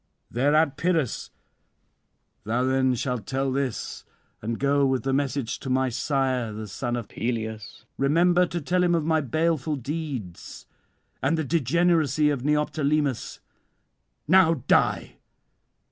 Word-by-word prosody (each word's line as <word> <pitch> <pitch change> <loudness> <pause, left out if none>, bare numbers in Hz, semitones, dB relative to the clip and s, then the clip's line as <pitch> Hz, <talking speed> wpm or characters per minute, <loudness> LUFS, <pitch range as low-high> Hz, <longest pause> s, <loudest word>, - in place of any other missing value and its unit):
Thereat 145 +3 +2
Pyrrhus: 165 -6 0 1.1
"Thou 115 +4 0
then 130 0 +2
shalt 125 -3 -3
tell 135 0 -1
this, 135 -3 -3 0.4
and 115 +1 -3
go 140 +1 +2
with 130 -1 +1
the 135 0 0
message 140 -3 -1
to 135 - -6
my 130 0 +2
sire 130 -2 -1
the 105 0 -6
son 120 +4 -3
of 120 -4 -5
Peleus: 110 -2 -5
remember 175 +5 +3
to 170 - -3
tell 180 +4 +1
him 175 -1 +3
of 160 -2 0
my 160 -1 +2
baleful 155 +1 0
deeds, 135 - -6 0.6
and 145 +5 +1
the 160 - 0
degeneracy 155 0 +2
of 135 -4 -3
Neoptolemus. 150 -2 0 0.9
Now 175 -1 +5
die." - - +2
140 Hz, 130 wpm, -25 LUFS, 125-155 Hz, 1.1 s, Now